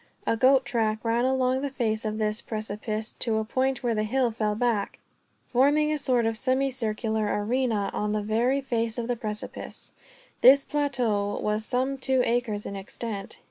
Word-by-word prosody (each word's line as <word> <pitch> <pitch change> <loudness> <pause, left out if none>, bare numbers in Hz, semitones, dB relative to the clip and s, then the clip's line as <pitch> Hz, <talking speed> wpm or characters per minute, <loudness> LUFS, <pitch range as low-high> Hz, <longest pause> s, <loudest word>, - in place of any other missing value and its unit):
A - - +2
goat 260 +3 +4
track 220 -3 0
ran 230 +2 +2
along 260 0 +1
the 285 - -2
face 225 -4 -1
of 215 0 -2
this 215 +1 0
precipice, 215 0 -4
to 225 -3 +1
a 220 - -1
point 260 +3 0
where 240 -1 +1
the 215 - 0
hill 245 +3 +1
fell 215 -1 -1
back, 225 -3 0 0.5
forming 290 +4 +3
a - - 0
sort 250 -4 +2
of 225 0 -1
semicircular 245 -4 0 0.2
arena 225 -3 0
on 210 0 -1
the 210 0 -1
very 240 +6 +1
face 230 -3 -1
of 235 -1 -2
the 245 - 0
precipice. 215 -2 -6 0.5
This 275 +2 +7
plateau 240 -9 0
was 210 +1 -1
some 260 +3 -1
two 260 -1 +2
acres 230 -3 -1
in 200 - -5
extent. 200 +1 -6
230 Hz, 175 wpm, -26 LUFS, 215-260 Hz, 0.5 s, This